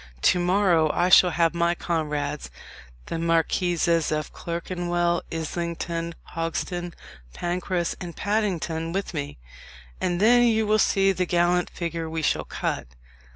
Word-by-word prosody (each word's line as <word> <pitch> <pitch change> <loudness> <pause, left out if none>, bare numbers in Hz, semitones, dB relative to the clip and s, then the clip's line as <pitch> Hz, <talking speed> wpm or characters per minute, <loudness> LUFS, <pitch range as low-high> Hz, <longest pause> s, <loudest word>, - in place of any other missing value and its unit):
To 180 - +4
morrow 175 -3 +3
I 175 +1 +2
shall 185 -1 +7
have 165 -1 +2
my 170 0 +1
comrades, 150 - -2 0.6
the 165 - -4
Marquises 165 0 +1
of 155 0 -2
Clerkenwell, 175 0 -1
Islington, 170 +1 -3 0.2
Hogsden, 175 +1 -3 0.4
Pancras, 175 0 -2
and 175 -2 -6
Paddington, 175 -6 -1
with 195 0 -3
me, 145 -3 -4 0.6
and 175 -1 0
then 240 +4 +6
you 220 -2 +3
will 215 +1 +3
see 195 -1 +3
the 185 -1 -1
gallant 175 +1 +2
figure 165 -1 -4
we 160 0 -3
shall - - +1
cut." - - -3
175 Hz, 130 wpm, -25 LUFS, 165-180 Hz, 0.6 s, shall